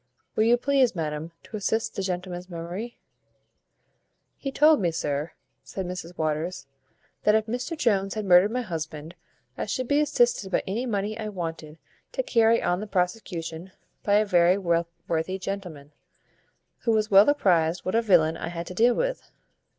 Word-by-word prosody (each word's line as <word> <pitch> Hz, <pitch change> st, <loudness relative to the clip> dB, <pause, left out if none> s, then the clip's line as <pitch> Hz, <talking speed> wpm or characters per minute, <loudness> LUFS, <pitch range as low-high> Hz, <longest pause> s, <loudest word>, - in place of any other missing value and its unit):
"Will 215 Hz, -, +3 dB
you 240 Hz, +1 st, +5 dB
please, 265 Hz, -3 st, +2 dB
madam, 155 Hz, 0 st, -3 dB
to 215 Hz, -, -7 dB
assist 220 Hz, +2 st, -1 dB
the -, -, -3 dB
gentleman's 180 Hz, -1 st, -4 dB
memory?" 180 Hz, +7 st, -6 dB, 1.4 s
"He 275 Hz, -, -5 dB
told 300 Hz, -2 st, +5 dB
me, 175 Hz, -, +2 dB
sir," 150 Hz, -1 st, -3 dB, 0.3 s
said 190 Hz, -, -6 dB
Mrs 180 Hz, -1 st, -7 dB
Waters, 155 Hz, +3 st, -2 dB, 0.6 s
"that 210 Hz, -, +4 dB
if 220 Hz, -1 st, +2 dB
Mr 250 Hz, +8 st, -4 dB
Jones 195 Hz, -7 st, +1 dB
had 215 Hz, -1 st, -3 dB
murdered 180 Hz, +2 st, +6 dB
my 250 Hz, +2 st, -2 dB
husband, 160 Hz, -4 st, -6 dB, 0.5 s
I -, -, -2 dB
should 255 Hz, +4 st, -2 dB
be 285 Hz, +2 st, +3 dB
assisted 240 Hz, -9 st, +1 dB
by -, -, +1 dB
any 230 Hz, +7 st, -2 dB
money 210 Hz, 0 st, -2 dB
I 215 Hz, -1 st, -3 dB
wanted 165 Hz, -5 st, -6 dB, 0.4 s
to -, -, -1 dB
carry 230 Hz, -, +3 dB
on 175 Hz, +1 st, +1 dB
the 215 Hz, -, -5 dB
prosecution, 180 Hz, -2 st, -3 dB, 0.3 s
by 205 Hz, -, +2 dB
a 215 Hz, +1 st, +4 dB
very 180 Hz, -1 st, +4 dB
worthy 170 Hz, 0 st, -1 dB
gentleman, 180 Hz, -7 st, -6 dB, 0.9 s
who 235 Hz, -, -3 dB
was 215 Hz, -1 st, +1 dB
well 200 Hz, +6 st, +7 dB
apprized 175 Hz, -, +2 dB
what 185 Hz, -, -1 dB
a 230 Hz, -, +3 dB
villain 165 Hz, -7 st, +3 dB
I -, -, -5 dB
had 170 Hz, 0 st, -5 dB
to 180 Hz, -, -8 dB
deal 235 Hz, +6 st, +4 dB
with. -, -, -2 dB
190 Hz, 165 wpm, -26 LUFS, 170-225 Hz, 1.4 s, well